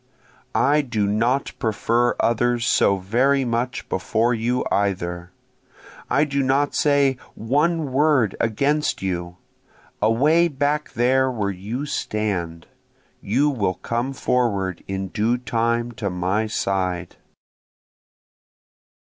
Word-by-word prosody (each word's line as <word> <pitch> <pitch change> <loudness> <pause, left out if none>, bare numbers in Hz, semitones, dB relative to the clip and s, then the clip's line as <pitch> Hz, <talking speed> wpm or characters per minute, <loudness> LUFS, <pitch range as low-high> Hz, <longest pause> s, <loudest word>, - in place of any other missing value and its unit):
I 150 +2 +3
do 115 -7 -1
not 115 +7 0
prefer 115 +1 +1
others 120 +1 +1
so 100 - +3
very 130 +8 +1
much 120 +1 -2
before 110 +5 0
you 120 +2 -1
either, 90 -3 -1 0.8
I 140 - +3
do 140 -2 0
not 135 +2 +1
say 140 -3 +2 0.2
one 150 +5 0
word 135 -6 +2
against 140 +4 0
you, 90 -1 -3 0.6
away 145 +11 +4
back 145 0 -1
there 130 +3 +2
where 105 -5 -2
you 105 +9 -5
stand, 95 - -3 0.6
(You 135 +9 +1
will 100 -8 -1
come 120 +7 -3
forward 100 -9 -1
in 95 0 -3
due 115 +5 0
time 115 0 -1
to 100 - 0
my 95 +5 -1
side.) 90 -4 -2
115 Hz, 110 wpm, -22 LUFS, 100-135 Hz, 0.8 s, away